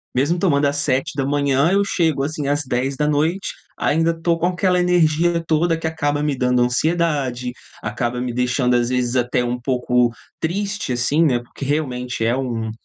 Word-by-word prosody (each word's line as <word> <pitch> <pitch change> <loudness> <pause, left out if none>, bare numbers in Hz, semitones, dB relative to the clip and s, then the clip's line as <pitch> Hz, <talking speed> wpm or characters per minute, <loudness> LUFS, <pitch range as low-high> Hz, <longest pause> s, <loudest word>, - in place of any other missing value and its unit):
Mesmo 145 +7 +1
tomando 150 -6 +2
às 140 0 0
7:00 135 -2 0
da 140 - 0
manhã 140 +1 +2
eu 200 +1 +3
chego 160 -8 +1
assim 145 0 -3
às 145 +1 +1
22:00 130 +2 -1
da 150 - +1
noite, 160 +6 0 0.3
ainda 165 +2 +2
tô 165 +1 0
com 175 - +2
aquela 180 0 +1
energia 170 -1 +2
toda 165 +1 +2
que 165 - -7
acaba 145 -2 -1
me 150 -2 0
dando 125 -1 +1
ansiedade, 135 -2 0 0.3
acaba 120 +3 -2
me 125 -1 -3
deixando, 125 +1 +1
às 120 0 +1
vezes, 125 -1 0
até 125 0 +1
um 120 0 -2
pouco 125 -1 +1 0.3
triste, 200 +1 -2
assim, 140 +6 +2
né, 130 -7 +2
porque 120 +3 -11
realmente 125 -5 -2
é 115 +2 +2
um 115 -4 -3
140 Hz, 180 wpm, -20 LUFS, 125-165 Hz, 0.3 s, eu